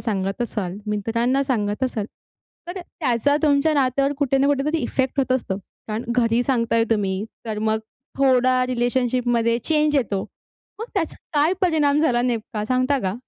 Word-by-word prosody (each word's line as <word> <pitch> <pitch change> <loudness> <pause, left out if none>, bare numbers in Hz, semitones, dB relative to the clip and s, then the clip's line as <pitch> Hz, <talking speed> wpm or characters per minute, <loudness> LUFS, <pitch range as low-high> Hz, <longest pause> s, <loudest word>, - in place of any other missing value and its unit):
सांगत 195 0 -2
असाल, 200 -6 -3
मित्रांना 230 +6 0
सांगत 215 -4 -1
असाल, 220 -5 -2 0.6
तर 365 +1 -5
त्याचा 285 -4 0
तुमच्या 295 +1 +3
नात्यावर 275 +1 +2
कुठे 275 -2 +2
ना 275 - +3
कुठेतरी 285 +3 +1
इफेक्ट 265 +1 -1
होत 260 -1 0
असतो. 235 -7 -1 0.3
कारण 215 +2 -3
घरी 235 0 +3
सांगताय 230 -3 +1
तुम्ही, 200 -2 0 0.2
तर 215 -1 -3
मग 220 0 +1 0.4
थोडा 255 -1 +4
रिलेशनशिपमध्ये 245 -1 +1
चेंज 300 +2 +1
येतो. 200 -7 0 0.6
मग 450 - -4
त्याचा 345 -5 -1 0.2
काय 295 +4 +3
परिणाम 300 -5 +3
झाला 245 -6 +2
नेमका, 225 -3 -2
सांगता 255 +4 +1
का? 190 -2 -1
250 Hz, 150 wpm, -22 LUFS, 225-280 Hz, 0.6 s, थोडा